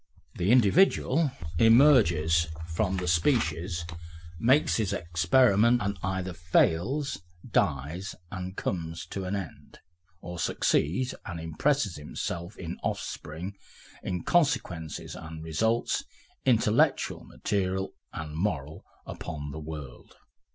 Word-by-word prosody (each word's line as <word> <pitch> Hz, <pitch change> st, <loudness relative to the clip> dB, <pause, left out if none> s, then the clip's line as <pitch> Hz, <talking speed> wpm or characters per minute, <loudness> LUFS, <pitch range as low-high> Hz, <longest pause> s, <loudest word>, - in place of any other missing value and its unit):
The 90 Hz, +2 st, -1 dB
individual 140 Hz, -, +4 dB, 0.3 s
emerges 100 Hz, -, +5 dB, 0.2 s
from 85 Hz, +3 st, -1 dB
the 90 Hz, -1 st, -3 dB
species, 85 Hz, -, +1 dB, 0.5 s
makes 130 Hz, -, +4 dB
his 110 Hz, -5 st, 0 dB
experiment, 105 Hz, +7 st, +3 dB
and 100 Hz, -2 st, -1 dB
either 95 Hz, 0 st, -2 dB
fails, 90 Hz, -, +1 dB, 0.3 s
dies, 75 Hz, +9 st, -1 dB, 0.2 s
and 95 Hz, 0 st, -6 dB
comes 85 Hz, -2 st, -3 dB
to 95 Hz, -1 st, -4 dB
an 95 Hz, +2 st, -2 dB
end, 95 Hz, -4 st, -7 dB, 0.4 s
or 90 Hz, 0 st, -7 dB
succeeds 100 Hz, -, +1 dB
and 85 Hz, -3 st, -6 dB
impresses 100 Hz, -, 0 dB
himself 85 Hz, +5 st, -5 dB
in 85 Hz, 0 st, -6 dB
offspring, 90 Hz, +5 st, -4 dB, 0.5 s
in 90 Hz, -2 st, -3 dB
consequences 85 Hz, -, 0 dB
and 80 Hz, 0 st, -8 dB
results, 110 Hz, +9 st, 0 dB, 0.4 s
intellectual, -, -, +3 dB
material 95 Hz, -1 st, -2 dB, 0.2 s
and 75 Hz, -1 st, -6 dB
moral, 80 Hz, -5 st, -2 dB, 0.2 s
upon 75 Hz, -2 st, -6 dB
the 75 Hz, -, -6 dB
world. 75 Hz, -4 st, -9 dB
90 Hz, 105 wpm, -28 LUFS, 80-110 Hz, 0.5 s, emerges